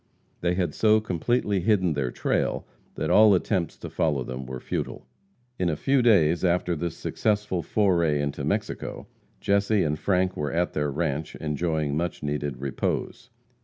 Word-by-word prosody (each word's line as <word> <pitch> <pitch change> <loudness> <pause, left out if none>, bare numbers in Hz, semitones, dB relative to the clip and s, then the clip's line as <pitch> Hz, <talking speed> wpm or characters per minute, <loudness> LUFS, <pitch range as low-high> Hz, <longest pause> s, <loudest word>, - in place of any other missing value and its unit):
They 90 0 0
had 90 -4 -1
so 110 0 +4
completely 105 +1 0
hidden 95 -3 +2
their 70 -4 -1
trail - - -1 0.3
that - - -1
all 105 -2 +7
attempts 90 -2 -1
to - - -7
follow 75 -5 0
them 65 +1 -6
were 65 0 -5
futile. - - -4 0.5
In 90 - +1
a 80 - 0
few 135 - +2
days 85 -9 +4
after 90 -1 +1
this 85 +1 -4
successful 105 -4 -1
foray 85 -5 +2
into 70 -1 -2
Mexico, - - -3 0.4
Jesse 100 0 +2
and 75 0 -1
Frank 95 -1 +1
were 75 -2 -2
at 85 +2 0
their 75 -1 0
ranche 75 0 -2
enjoying 75 -1 -1
much 85 0 -3
needed 75 -2 -2
repose. 70 - -3
85 Hz, 160 wpm, -26 LUFS, 75-100 Hz, 0.5 s, all